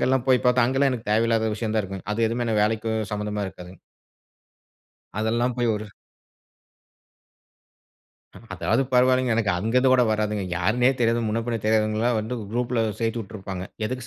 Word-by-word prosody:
அங்கெல்லாம் 130 -1 +1
போய் 130 -1 +4
பாத்தா, 125 -1 +4
அங்கெல்லாம் 135 +2 +2
எனக்கு 115 -3 -6
தேவயில்லாத 115 0 +2
விஷயம் 110 0 -3
தான் 110 - +2
இருக்கும். 95 -1 -7
அது 115 - -2
எதுவுமே 115 -1 -1
வேலைக்கும் 110 +1 0
சம்மந்தமா 105 0 -3
இருக்காதுங்க. 90 -1 -11 1.4
அதெல்லாம் 120 +2 0
போய் 120 -2 +1
ஒரு 105 +1 -6 2.7
அதாவது 115 +4 +1
பரவாயில்லங்க. 130 -1 +3
எனக்கு 105 -3 +1
அங்க 110 +6 -2
இருந்து 130 0 +4
கூட 125 -1 +5
வராதுங்க. 105 -2 -1
யார்னே 120 +9 +2
தெரியாது. 115 0 +2
முன்ன 115 +2 -1
பின்ன 115 -1 -1
தெரியாதவங்கலாம் 110 +2 +1
வந்து 120 +4 -4 0.2
குரூப்ல 120 -1 0 0.2
சேத்து 115 0 -1
உட்டுருப்பாங்க. 95 -3 -7 0.2
எதுக்கு 130 +1 -5
115 Hz, 145 wpm, -24 LUFS, 105-125 Hz, 2.7 s, கூட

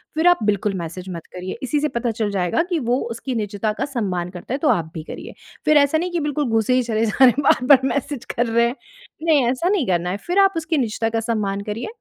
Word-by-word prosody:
फ़िर 320 +3 +2
आप 355 - +5
बिल्कुल 205 -1 +1
मैसेज 170 +1 -6
मत 170 -3 -7
करिए। 185 +1 -6
इसी 265 +3 0
से 300 - +1
पता 235 -1 -1
चल 220 -2 -2
जाएगा 190 - +1
कि 345 -3 0
वो 245 -2 +1
उसकी 240 +3 -4
निज़ता 210 -1 -2
का 265 - -2
सम्मान 195 -10 -2
करता 180 +6 -7
है - - 0
तो 295 +1 +1
आप 160 - +1
भी 160 - -6
करिए। - - -9 0.3
फ़िर 305 0 +5
ऐसा 285 +2 +4
नहीं 355 +3 -2
कि 345 - -1
बिल्कुल 295 -1 -1
घुसे 225 +2 +2
ही 255 0 +3
चले 225 -1 0
जा 215 - -3
रहे 260 - +10
हैं 265 +4 0
बार-बार 260 0 +5
मैसेज 280 -2 -3
कर 240 - +2
रहे 235 +1 +3
हैं 240 - -3 0.5
नहीं 305 -6 +4
ऐसा 265 +8 0
नहीं 380 -10 +1
करना 175 -1 0
है 190 - -2
फ़िर 355 +3 +2
आप 390 0 +5
उसकी 325 0 -1
निज़ता 225 -3 0
का 225 0 -1
सम्मान 210 -3 -2
करिए। 225 +3 -4
235 Hz, 255 wpm, -21 LUFS, 205-290 Hz, 0.5 s, रहे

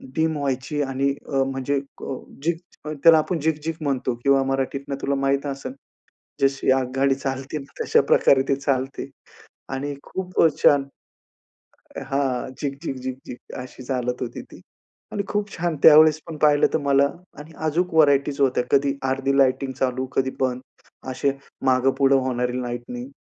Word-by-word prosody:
Dim 160 -1 +1
व्हायची 140 +1 -2
आणि 135 0 0 0.2
अ, 135 -2 +1
म्हणजे 135 +1 -1 0.3
अ, 135 - -3 0.3
झिग 165 0 +1 0.3
अ, 150 - -4
त्याला 165 -1 +8
आपण 165 +2 -1
झिगझिग 160 +1 -1
म्हणतो 130 -4 -1
किंवा 140 -1 +4
मराठीतनं 135 +1 -2
तुला 140 0 0
माहीत 135 +1 0
असेल, 135 -2 -5 0.7
जशी 135 -1 +2
आगगाडी 135 +1 +1
चालते 135 +2 -4
ना, 140 -1 -12
तशा - - +4
प्रकारे 135 -1 +5
ती 135 - +2
चालते. 135 -1 -2 0.6
आणि 140 +2 -3
खूप 185 -1 -2
अ, - - +8 0.2
छान 140 -1 +5 1.2
हां, 135 -2 -1
झिक-झिक, 140 0 -4
झिक-झिक 130 -1 -8
अशी 130 +1 -9
चालत 125 -1 -2
होती 120 - -4
ती. - - -13 0.5
आणि 200 - -2
खूप 205 0 -2
छान 170 -1 -2
त्यावेळेस 155 0 +8
पण 160 -2 -7
पाहिलं 145 -1 +4
तर - - +4
मला 140 0 +4 0.3
आणि 150 +2 -11 0.2
अजूक 170 +3 0
व्हरायटीज 145 -2 +3
होत्या. 130 -2 +2
कधी 140 0 +3 0.2
अर्धी 135 +1 0
लाइटिंग 135 0 +2
चालू, 130 0 -1
कधी 130 0 +1
बंद, 130 -1 0 0.5
असे 130 +2 0 0.3
मागे-पुढे 135 +1 +3
होणारी 125 0 -1
लाइटिंग. 120 +1 -5
135 Hz, 150 wpm, -23 LUFS, 130-145 Hz, 1.2 s, त्याला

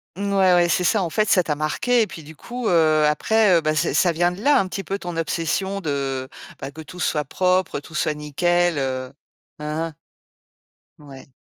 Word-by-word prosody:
Ouais, 195 -1 +2
ouais, 175 0 +4
c'est 175 +1 +1
ça, 200 +2 +2
en 170 - -3
fait, 215 +2 +1
ça 180 - +4
t'a 150 - -1
marqué, 155 +11 +1
et 215 - +1
puis, 160 - -10
du 155 +1 -12
coup, 245 +4 -5
heu, 155 -3 +4
après, 200 +5 +3
heu, - - +1
ben 155 0 0
ça - - 0
ça 175 - +3
vient 175 +2 +1
de 180 +3 -9
là, 285 +4 +4
un 190 - 0
petit 195 +1 -5
peu, 195 - -3
ton 175 -3 -6
obsession 165 +5 -2
de, 135 -5 -3 0.3
ben, 135 +1 -6
que 160 - -10
tout 180 +3 -11
soit 150 -3 0
propre, 185 +5 0
tout 145 - -15
soit 155 0 0
nickel, 175 +3 0
heu, 130 0 -3 0.5
hein 150 +2 -3
hein. 155 - -17 1.0
Ouais. 135 -3 -13
165 Hz, 210 wpm, -22 LUFS, 150-190 Hz, 1.0 s, ouais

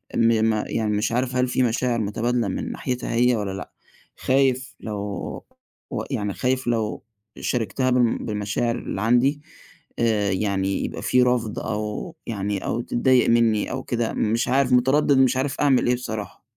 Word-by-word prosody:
م 115 -1 +3
ما 110 -1 +1
يعني 110 -2 -1
مش 105 +2 0
عارف 125 +1 -1
هل 125 0 +2
في 125 +1 +1
مشاعر 120 0 0
مُتبادلَة 115 +2 0
من 95 - -3
ناحيتها 125 -2 -3
هي 120 +1 +3
والّا 100 -3 -2
لأ، 95 0 -7 0.5
خايف 130 -1 +1
لو 105 -2 -5 0.9
و - - -3
يعني 105 -6 -2
خايف 130 +2 -1
لو 110 -3 -1 0.4
شارِكتها 125 +2 -1
بم 125 -2 +3
بالمشاعر 105 +3 -1
اللي 95 - -5
عندي 125 +6 +2 0.6
آآ 105 -4 +2
يعني 95 0 0
يبقى - - -6
في 125 0 +3
رَفض 125 -3 0
أو 105 +10 -4
يعني 100 -3 -3
أو 120 - -1
تضّايق 125 +1 +2
منّي 115 -3 +2
أو - - -4
كده 120 -2 -2
مش 115 +2 0
عارف 130 +1 +2
مُتردِد 135 +3 +4
مش 130 -1 +4
عارف 135 +1 -1
أعمل 135 -4 +3
إيه 125 - +3
بصراحة. 110 -4 -6
120 Hz, 165 wpm, -23 LUFS, 105-125 Hz, 0.9 s, مُتردِد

